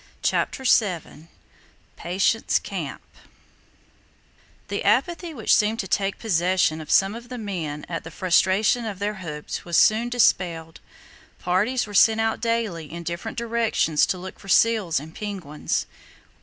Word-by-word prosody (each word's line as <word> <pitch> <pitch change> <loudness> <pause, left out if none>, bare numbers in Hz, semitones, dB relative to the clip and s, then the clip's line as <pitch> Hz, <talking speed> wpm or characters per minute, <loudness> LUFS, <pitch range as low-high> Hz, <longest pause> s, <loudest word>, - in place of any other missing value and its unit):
CHAPTER 265 - 0
VII 180 - +1 0.7
PATIENCE 190 +6 +1
CAMP 170 -9 -6 1.6
The 200 - -3
apathy 330 - +1
which 235 -9 +1
seemed 215 +1 +1
to 190 - -7
take 195 +1 0
possession 180 -5 +1
of 155 - -11
some 195 +1 +4
of 235 +1 -10
the 250 - -6
men 170 -9 -5
at 165 -2 -4
the 165 - -8
frustration 190 +6 +2
of 210 -3 -5
their 205 +2 -2
hopes 150 -4 -6
was 170 -2 0
soon 225 +3 +4
dispelled. 170 -9 +1 0.6
Parties 210 +8 0
were 205 - -10
sent 220 +2 +5
out 225 0 0
daily 225 -9 -2
in 170 +1 -7
different 170 +7 -5
directions 230 -9 +1
to 185 - -1
look 185 +1 -9
for - - -14
seals 210 -7 +3
and 155 +3 -11
penguins. 185 -9 -3
195 Hz, 140 wpm, -24 LUFS, 170-225 Hz, 1.6 s, sent